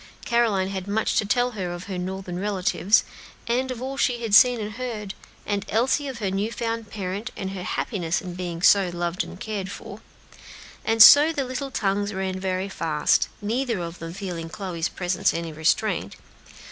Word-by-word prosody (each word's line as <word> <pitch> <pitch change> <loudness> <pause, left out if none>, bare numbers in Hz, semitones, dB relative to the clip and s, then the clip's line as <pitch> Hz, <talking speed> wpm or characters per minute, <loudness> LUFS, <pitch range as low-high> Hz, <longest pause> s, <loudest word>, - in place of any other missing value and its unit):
Caroline 220 -6 +2
had 190 -1 -5
much 215 +2 0
to 215 - +2
tell 245 +4 +2
of 180 -6 -5
her 190 -1 -5
Northern 185 -1 -4
relatives, 195 0 +2 0.4
and 250 +3 0
of 255 -1 -5
all 270 +1 -4
she 240 -3 0
had 220 -3 -3
seen 245 +2 +7
and 210 0 -4
heard, 220 -4 -5 0.3
and 205 -1 -1
Elsie 265 +6 +1
of 265 -3 -5
her 200 -4 -2
new 200 +4 -1
found 230 -2 -3
parent, 200 +3 -4
and 190 -1 -4
her 195 -2 -6
happiness 180 -2 -2
in 180 -2 -7
being 175 -1 -5
so 195 -3 +6
loved 175 +2 -2
and - - -10
cared 205 -4 -4
for; 200 - -9 0.8
and 225 0 +7
so 295 +5 +9
the 285 -4 -1
little 255 +2 -4
tongues 205 -3 -1
ran 190 0 -2
very 185 0 -2
fast, 160 -6 +1
neither 235 +2 -1
of 170 0 -6
them 165 0 -6
feeling 175 -3 -5
Chloe's 175 -3 -3
presence 180 -1 0
any 165 -1 -4
restraint. 155 +1 0
200 Hz, 180 wpm, -24 LUFS, 180-230 Hz, 0.8 s, so